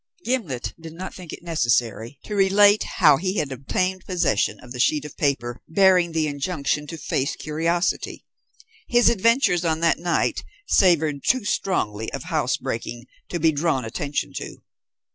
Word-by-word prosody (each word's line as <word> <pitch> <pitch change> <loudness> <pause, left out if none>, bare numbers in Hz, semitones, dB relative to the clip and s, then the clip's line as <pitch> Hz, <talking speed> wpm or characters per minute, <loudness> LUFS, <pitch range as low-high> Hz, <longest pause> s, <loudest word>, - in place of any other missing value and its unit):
Gimblet 190 - -2
did 165 -1 -10
not 185 +3 -7
think 180 -4 -10
it - - -9
necessary 120 -6 0
to 210 - -7
relate 205 +1 +5 0.2
how 150 -2 +6
he 185 +5 -2
had 150 -3 -1
obtained 185 +8 -2
possession 175 - 0
of 125 - -14
the 125 - -7
sheet 150 +4 +2
of 150 - -9
paper 120 -5 -1
bearing 180 -1 +4
the 160 -1 0
injunction 150 0 -2
to 165 - -7
"face 135 -2 -2
curiosity." 165 +3 -2 0.6
His 240 -1 +4
adventures 230 -4 +2
on 160 -2 0
that 165 -1 +2
night 175 0 0 0.2
savoured 160 -6 +3
too 255 -4 +1
strongly 110 - -1
of - - -5
house - - 0
breaking 120 +1 -5 0.2
to 175 - -3
be 160 0 +4
drawn 145 -4 0
attention 140 +6 -3
to. - - -8
160 Hz, 160 wpm, -23 LUFS, 140-185 Hz, 0.6 s, how